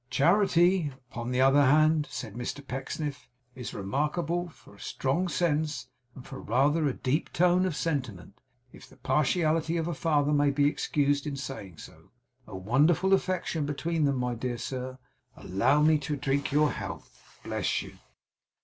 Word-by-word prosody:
'Charity, 175 0 +3 0.2
upon 120 0 -5
the 125 0 -1
other 135 +2 +5
hand,' 155 +2 +4
said 110 -5 -6
Mr 125 +4 -6
Pecksniff, 140 +1 -5 0.2
'is 125 -2 -7
remarkable 150 - -2
for - - -19
strong 140 +8 -1
sense, 150 -6 -1 0.3
and 125 - -11
for 135 - -8
rather 145 +7 +2
a 135 - 0
deep 140 +5 -1
tone 180 +2 +3
of 170 - -3
sentiment, 130 - -3 0.4
if - - -14
the - - -19
partiality 160 +2 +1
of 165 0 -1
a 175 - -2
father 150 -2 +1
may 145 0 +3
be 140 +1 +2
excused 145 0 0
in 145 - -3
saying 130 - -7
so. - - -14 0.4
A 100 - -7
wonderful 145 - +2
affection 180 -5 0
between 160 +2 -1
them, 140 -1 +1
my 125 -1 -1
dear 120 +1 -3
sir! 130 +1 -5 0.4
Allow 120 +11 +2
me 155 0 +4
to 145 +1 -3
drink 140 +1 -1
your 150 +1 +3
health. - - -9
Bless - - -1
you! - - -13
145 Hz, 160 wpm, -28 LUFS, 130-160 Hz, 0.4 s, other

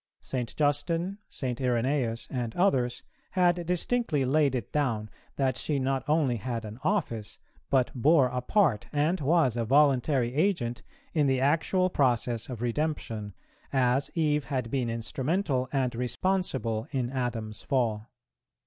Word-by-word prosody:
St. 125 -3 -4
Justin, 165 +6 0
St. 125 -3 -3
Irenæus, 120 -2 0
and 120 -4 -3
others, 130 -10 +1 0.3
had 175 -2 +3
distinctly 180 - +1
laid 140 0 +2
it 120 -5 -4
down, 115 -8 -1 0.2
that 130 -2 +1
she 150 - -1
not 135 0 0
only 150 -6 +2
had 115 +1 -4
an 110 +3 -8
office, 120 - -1 0.3
but 130 -2 +2
bore 140 +3 +4
a 125 0 -2
part, 145 - +2
and 155 +5 +1
was 145 -4 +3
a 120 - 0
voluntary 135 -1 +3
agent, 145 -7 0 0.3
in 150 -4 +3
the 130 -1 +2
actual 165 +6 +2
process 120 -5 +1
of 120 -2 -5
redemption, 115 - -2 0.4
as 130 0 +2
Eve 150 -3 +1
had 130 -5 -3
been 130 -4 0
instrumental 130 - -1
and 130 -3 0
responsible 125 - -1
in 130 -4 -2
Adam's 115 -5 -3
fall. 115 -5 -1
130 Hz, 140 wpm, -28 LUFS, 120-150 Hz, 0.4 s, bore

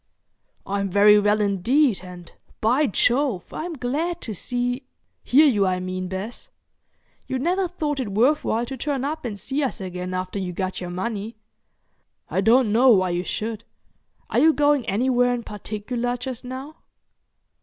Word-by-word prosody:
"I'm 200 0 -1
very 210 +2 +6
well 210 +1 +2
indeed, 210 +5 +2
and, 180 -2 -11 0.3
by 255 +7 +3
Jove! 240 -3 +1
I'm 335 +2 -4
glad 310 +6 -2
to 220 - -5
see—hear 245 - 0
you, 210 -9 +3
I 185 0 0
mean, 185 0 -4
Bess. 195 +6 -6 0.8
You 260 - -2
never 360 +7 0
thought 305 -5 -3
it 235 -6 -3
worth 255 +9 +3
while 230 +2 0
to 265 - -6
turn 275 0 -2
up 310 0 -4
and 210 -4 -4
see 270 +8 -2
us 265 -4 -2
again 180 -1 -5
after 185 +2 -3
you 180 -2 -4
got 185 +1 -3
your 180 - -5
money. 205 +4 -4 1.0
I 190 - +1
don't 225 +2 +4
know 245 +5 +5
why 185 -6 +4
you 175 +1 -1
should. 220 +2 -4 0.7
Are - - +3
you 320 +1 +6
going 290 -3 +2
anywhere 245 +3 +2
in 235 - -5
particular 230 +4 -4
just 250 0 -6
now?" 260 +5 -7
235 Hz, 160 wpm, -23 LUFS, 195-265 Hz, 1.0 s, very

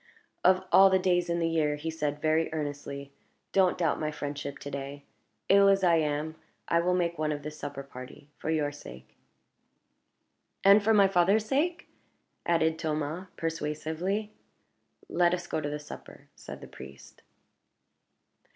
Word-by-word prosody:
"Of 185 0 +4
all 195 0 +8
the 190 - +4
days 175 -2 +1
in 170 - +1
the 165 -1 +1
year," 155 -3 +1
he 160 +2 -4
said, 150 -2 -3
very 160 +1 +2
earnestly, 145 -2 -5 0.4
"don't 190 -2 +3
doubt 165 -3 +1
my 155 - -1
friendship 145 -1 -5
to 145 - -8
day. 140 +1 -6 0.4
Ill 200 0 +6
as 195 -1 +3
I 170 -2 +5
am, 150 0 -1 0.3
I 170 - +3
will 180 +1 +2
make 170 -2 -1
one 155 -1 0
of 145 -1 -4
the 150 - -5
supper 145 -2 -7
party, 130 +1 -11
for - - -4
your 150 -2 +1
sake 65 - -12 0.7
" - - -49
"And 200 +1 +7
for 220 - +3
my 200 -2 +6
father's 195 +3 +3
sake?" 330 +9 0 0.6
added 160 -1 +2
Thomas, 155 +3 -3
persuasively. 165 +6 -3 0.7
"Let 175 0 +3
us 175 -1 -7
go 155 - -2
to 145 - -3
the 150 - -3
supper," 150 0 -12
said - - -10
the - - -9
priest. 70 0 -13
160 Hz, 160 wpm, -29 LUFS, 145-180 Hz, 0.7 s, all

